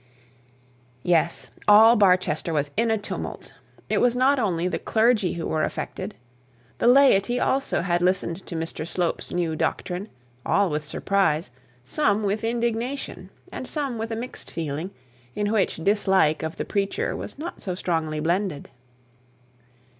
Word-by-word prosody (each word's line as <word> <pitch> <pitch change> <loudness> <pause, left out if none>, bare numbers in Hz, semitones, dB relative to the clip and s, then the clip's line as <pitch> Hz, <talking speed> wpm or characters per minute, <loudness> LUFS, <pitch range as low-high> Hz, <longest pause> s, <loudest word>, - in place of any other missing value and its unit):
Yes! 170 -1 +1 0.2
All 220 +3 +8
Barchester 180 -6 +2
was 145 -1 -1
in 230 +2 +1
a 220 - +2
tumult. 205 - -6 0.3
It - - +1
was 245 -1 +3
not 265 +2 +3
only 180 -6 0
the 185 - -2
clergy 220 -4 +2
who 170 - -4
were 155 - -1
affected. - - -4 0.6
The - - +2
laity 245 -3 +5
also 270 +2 +1
had 175 -1 0
listened 180 0 0
to 175 - -6
Mr 165 0 -4
Slope's 175 0 -1
new 170 -3 -1
doctrine, 180 +5 -2 0.3
all 200 -4 +2
with 150 0 -2
surprise, 160 -3 0 0.3
some 210 - +1
with 205 +2 -1
indignation, 235 +3 -2 0.2
and - - -6
some 275 -7 -2
with 225 0 -3
a - - -1
mixed 245 +3 -5
feeling, 160 +2 -4 0.5
in 205 0 -1
which 215 -4 +1
dislike 190 -6 +3
of 160 0 -4
the - - -3
preacher 200 -1 -1
was - - -6
not 330 +4 -7
so 185 -2 -3
strongly 160 -4 -2
blended. 170 -1 -1
195 Hz, 145 wpm, -24 LUFS, 165-225 Hz, 0.6 s, All